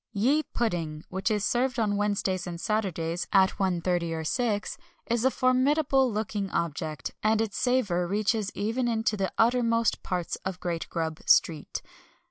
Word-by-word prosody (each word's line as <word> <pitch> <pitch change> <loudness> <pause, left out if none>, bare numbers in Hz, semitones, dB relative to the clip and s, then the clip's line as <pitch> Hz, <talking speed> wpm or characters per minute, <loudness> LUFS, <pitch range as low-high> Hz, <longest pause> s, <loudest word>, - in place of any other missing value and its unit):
Ye 255 +9 +3
Pudding, 165 - -3
which 190 +4 -1
is 210 -2 0
served 255 +3 +1
on 210 -3 +1
Wednesdays 200 -3 -1
and 170 -1 -5
Saturdays, 175 -5 -1
at 190 -1 +4
1.30 190 -1 +2
and 175 -2 -2 0.8
6.0, - - -6 0.3
is 235 -1 +1
a 265 - +5
formidable 265 +1 +2
looking 210 -2 -2
object, 155 -5 -3
and 215 +1 +2
its 220 -3 -1
savour 205 -9 +1
reaches 210 +1 0
even 230 +4 -1
into 225 -2 +1
the 195 -2 -1
uttermost 230 -1 +2
parts 180 -2 -3
of 190 -1 -5
Great 170 -2 -3
Grub 160 -1 -3
Street. 155 -3 +2
205 Hz, 150 wpm, -27 LUFS, 175-235 Hz, 0.8 s, a